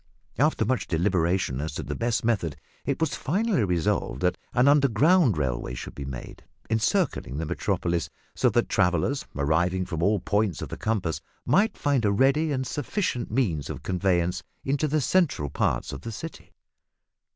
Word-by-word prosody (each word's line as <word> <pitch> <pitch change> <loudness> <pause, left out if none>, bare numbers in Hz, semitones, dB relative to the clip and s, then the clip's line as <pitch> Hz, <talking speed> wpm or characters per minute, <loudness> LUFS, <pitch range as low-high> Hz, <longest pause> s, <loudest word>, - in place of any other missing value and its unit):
After 150 +3 +3
much 130 -5 0
deliberation 85 -4 +1
as 80 - -4
to - - -3
the 70 - -4
best 115 +5 -1
method, 100 -10 0 0.3
it 140 - 0
was 160 -2 0
finally 195 - +1
resolved 85 -8 0
that 90 0 +2 0.2
an 125 +3 +3
underground 140 - +4
railway 60 -3 -2
should - - -7
be 70 - -6
made, 65 -2 -8 0.3
encircling 110 - 0
the 80 - -2
Metropolis, 85 +2 -1 0.2
so - - +3
that - - +1
travellers 135 - +1
arriving 85 +6 +1
from 85 -3 -4
all 100 +3 +3
points 100 -2 0
of - - -6
the - - -5
compass 100 -7 -1 0.2
might 200 - +3
find 140 -4 +1
a 105 - +3
ready 135 +8 +3
and 130 -2 -1
sufficient 145 - -2
means 100 - 0
of - - -6
conveyance 90 -2 +1 0.2
into 140 +3 +1
the 150 +1 +1
central 135 - +1
parts - - 0
of - - -6
the 115 - -6
city. 160 +8 -8
105 Hz, 165 wpm, -26 LUFS, 85-140 Hz, 0.3 s, underground